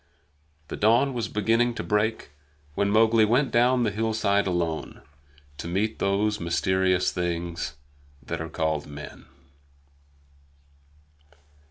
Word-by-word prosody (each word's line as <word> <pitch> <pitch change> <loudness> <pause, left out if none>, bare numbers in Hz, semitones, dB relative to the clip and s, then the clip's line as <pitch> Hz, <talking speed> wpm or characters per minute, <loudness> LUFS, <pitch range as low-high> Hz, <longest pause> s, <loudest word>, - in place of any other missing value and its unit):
The - - -4
dawn 120 +6 +3
was 120 -3 -2
beginning 115 +3 +1
to - - -4
break 105 -5 -1 0.4
when 100 +6 0
Mowgli 110 +1 +4
went 125 +6 +2
down 125 +1 +3
the 110 - +1
hillside 105 -2 0
alone, 85 -3 -3 0.6
to - - -5
meet 100 +5 -1
those 105 +2 0
mysterious 95 +2 +1
things 85 -3 -3 0.5
that 70 - -4
are 80 - -5
called 80 -2 -2
men. 75 0 -10
100 Hz, 115 wpm, -25 LUFS, 85-115 Hz, 0.6 s, Mowgli